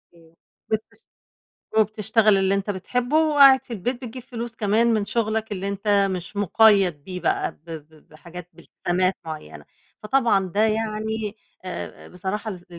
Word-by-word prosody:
إمم، 165 Hz, -1 st, -21 dB, 0.4 s
وبتش 220 Hz, 0 st, -3 dB, 0.8 s
وبتشتغل 215 Hz, 0 st, +3 dB
اللي 195 Hz, 0 st, +2 dB
أنت 200 Hz, +1 st, -2 dB
بتحبه، 245 Hz, -, -1 dB
وقاعد 285 Hz, -5 st, +6 dB
في -, -, -10 dB
البيت 240 Hz, +5 st, -3 dB
بتجيب 245 Hz, +1 st, -8 dB
فلوس 235 Hz, -2 st, -7 dB
كمان 215 Hz, +2 st, +2 dB
من 215 Hz, -2 st, 0 dB
شغلك 220 Hz, 0 st, -2 dB
اللي 195 Hz, 0 st, -3 dB
أنت 200 Hz, 0 st, +1 dB
مش 185 Hz, +2 st, -5 dB
مقيّد 200 Hz, -6 st, +3 dB
بيه 180 Hz, -1 st, -6 dB
بقى 385 Hz, -, 0 dB
ب -, -, -31 dB
ب 155 Hz, -1 st, -11 dB
بحاجات 170 Hz, +3 st, -11 dB
بالتزامات 175 Hz, +2 st, -2 dB
معيّنة 155 Hz, -1 st, -8 dB, 0.4 s
فطبعًا 215 Hz, -4 st, +2 dB
ده 200 Hz, +4 st, -1 dB
يعني 220 Hz, 0 st, -2 dB, 0.3 s
آآ، 185 Hz, -, -7 dB
بصراحة 190 Hz, +5 st, -4 dB
ال 180 Hz, -3 st, -9 dB
210 Hz, 145 wpm, -23 LUFS, 185-225 Hz, 0.8 s, وقاعد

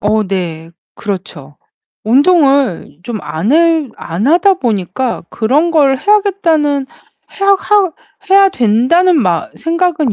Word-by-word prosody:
어 215 Hz, +1 st, 0 dB
네. 165 Hz, -4 st, -5 dB, 0.2 s
그렇죠. 175 Hz, -8 st, -7 dB, 0.5 s
운동을 275 Hz, -, +2 dB
좀 235 Hz, -2 st, -5 dB
안 200 Hz, -, -3 dB
해 325 Hz, -3 st, +2 dB
안 175 Hz, +9 st, -4 dB
하다 360 Hz, +5 st, +3 dB
보니까 230 Hz, -, -3 dB
그런 285 Hz, +10 st, 0 dB
걸 275 Hz, -5 st, +2 dB
해야겠다는 335 Hz, -9 st, 0 dB, 0.5 s
해야 395 Hz, -, +1 dB
하 400 Hz, -5 st, +1 dB, 0.4 s
해야 390 Hz, 0 st, +6 dB
된다는 260 Hz, -, +2 dB
마 175 Hz, -6 st, -1 dB
생각은 330 Hz, -, -1 dB
275 Hz, 220 characters per minute, -13 LUFS, 210-340 Hz, 0.5 s, 해야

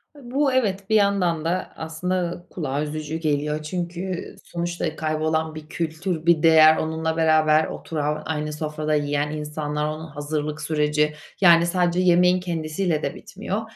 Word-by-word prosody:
E, -, -, -14 dB
bu 275 Hz, 0 st, +2 dB
evet, 200 Hz, -6 st, 0 dB
bir 220 Hz, -, +3 dB
yandan 190 Hz, -6 st, +2 dB
da 180 Hz, +3 st, -2 dB
aslında 175 Hz, +2 st, -3 dB
kulağa 145 Hz, -4 st, -3 dB
üzücü 155 Hz, +1 st, -4 dB
geliyor. 150 Hz, -1 st, -1 dB
Çünkü 175 Hz, +2 st, -4 dB
sonuçta 170 Hz, -2 st, -3 dB
kaybolan 155 Hz, 0 st, -1 dB
bir 155 Hz, 0 st, -9 dB
kültür, 165 Hz, +1 st, -3 dB
bir 170 Hz, -3 st, +4 dB
değer 160 Hz, -1 st, +7 dB
onunla 160 Hz, 0 st, -2 dB
beraber 155 Hz, -1 st, +4 dB
oturan 150 Hz, -1 st, -3 dB
aynı 150 Hz, -1 st, -3 dB
sofrada 155 Hz, 0 st, -2 dB
yiyen 145 Hz, 0 st, 0 dB
insanlar 150 Hz, 0 st, -3 dB
onun 155 Hz, +1 st, -4 dB
hazırlık 150 Hz, 0 st, -4 dB
süreci, 150 Hz, 0 st, +1 dB, 0.3 s
yani, 170 Hz, -2 st, +7 dB
sadece 175 Hz, 0 st, +1 dB
yemeğin 180 Hz, 0 st, +4 dB
kendisiyle 165 Hz, -1 st, -2 dB
de -, -, -2 dB
bitmiyor 205 Hz, +2 st, -5 dB
160 Hz, 145 wpm, -23 LUFS, 150-175 Hz, 0.3 s, değer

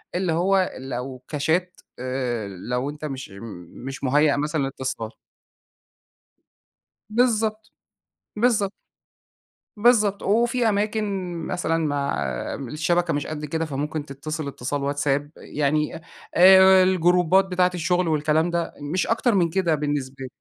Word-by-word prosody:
اللي 180 Hz, -2 st, 0 dB
هُو 190 Hz, +2 st, +2 dB
لو 130 Hz, 0 st, -6 dB
كchat 160 Hz, +5 st, +1 dB, 0.3 s
آآ، 125 Hz, -4 st, -2 dB
لو 125 Hz, +8 st, -3 dB
أنت 150 Hz, +1 st, -7 dB
مش 135 Hz, -2 st, -6 dB, 0.6 s
مش 135 Hz, +1 st, -7 dB
م -, -, +1 dB
مُهيأ 145 Hz, +2 st, +3 dB
مثلًا 150 Hz, +1 st, -1 dB
للإتصال. 130 Hz, -4 st, -4 dB, 2.0 s
بالضبط، 220 Hz, -2 st, +1 dB, 0.6 s
بالضبط. 210 Hz, -3 st, +2 dB, 1.0 s
بالضبط، 210 Hz, -3 st, +3 dB
وفي 235 Hz, +2 st, +2 dB
أماكن 205 Hz, -3 st, -1 dB
مثلًا 180 Hz, -3 st, -1 dB
مع 140 Hz, -1 st, -1 dB, 0.4 s
م 135 Hz, -, -6 dB
الشبكة 165 Hz, +5 st, 0 dB
مش 145 Hz, 0 st, -2 dB
قد 150 Hz, -1 st, -5 dB
كده، 160 Hz, +2 st, -2 dB
فممكن 150 Hz, +1 st, -3 dB
تتصل 150 Hz, +2 st, -5 dB
إتصال 140 Hz, +1 st, -3 dB
واتساب 145 Hz, 0 st, 0 dB
يعني 150 Hz, +1 st, -1 dB, 0.4 s
آآ، 190 Hz, +1 st, +8 dB
الجروبات 180 Hz, 0 st, +3 dB
بتاعة 180 Hz, -1 st, +1 dB
الشغل 180 Hz, +1 st, 0 dB
والكلام 155 Hz, +1 st, +2 dB
ده، 170 Hz, -1 st, -2 dB, 0.2 s
مش 185 Hz, -, 0 dB
أكتر 230 Hz, 0 st, +2 dB
من 175 Hz, -3 st, +3 dB
كده 170 Hz, -2 st, +1 dB
بالنسبة 145 Hz, -3 st, -2 dB
لي. 135 Hz, -, -5 dB
160 Hz, 125 wpm, -24 LUFS, 140-190 Hz, 2.0 s, آآ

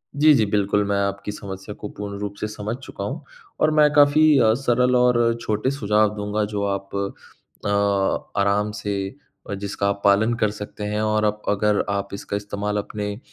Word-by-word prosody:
जी, 150 Hz, +1 st, +6 dB
जी, 115 Hz, -6 st, +3 dB
बिल्कुल 100 Hz, 0 st, +1 dB
मैं 100 Hz, 0 st, 0 dB
आपकी 100 Hz, +1 st, -2 dB
समस्या 100 Hz, 0 st, -7 dB
को 105 Hz, -, -6 dB
पूर्ण 100 Hz, 0 st, -6 dB
रूप 100 Hz, -1 st, -4 dB
से 105 Hz, -, -2 dB
समझ 105 Hz, +1 st, -4 dB
चुका 100 Hz, -, -7 dB
हूँ 140 Hz, +9 st, -4 dB, 0.4 s
और 155 Hz, -, +3 dB
मैं 150 Hz, -1 st, +5 dB
काफ़ी 145 Hz, +1 st, +5 dB, 0.4 s
सरल 125 Hz, 0 st, +2 dB
और 120 Hz, -1 st, +4 dB
छोटे 120 Hz, +3 st, 0 dB
सुझाव 105 Hz, -5 st, +2 dB
दूँगा 105 Hz, +1 st, -1 dB
जो 100 Hz, -1 st, -1 dB
आप 100 Hz, 0 st, -6 dB, 0.7 s
अ, -, -, 0 dB, 0.7 s
आराम 100 Hz, +1 st, +2 dB
से 100 Hz, 0 st, -4 dB, 0.4 s
जिसका 100 Hz, 0 st, -2 dB
आप 100 Hz, 0 st, -3 dB
पालन 105 Hz, +4 st, +4 dB
कर 105 Hz, -, +3 dB
सकते 105 Hz, 0 st, -8 dB
हैं। 105 Hz, +1 st, -1 dB
और 110 Hz, 0 st, +1 dB
अप 105 Hz, 0 st, -1 dB
अगर 105 Hz, 0 st, +2 dB
आप 100 Hz, 0 st, -2 dB
इसका 100 Hz, 0 st, -4 dB
इस्तेमाल 105 Hz, 0 st, -3 dB
अपने 105 Hz, 0 st, -3 dB
अ, -, -, -12 dB
105 Hz, 180 wpm, -23 LUFS, 100-110 Hz, 0.7 s, जी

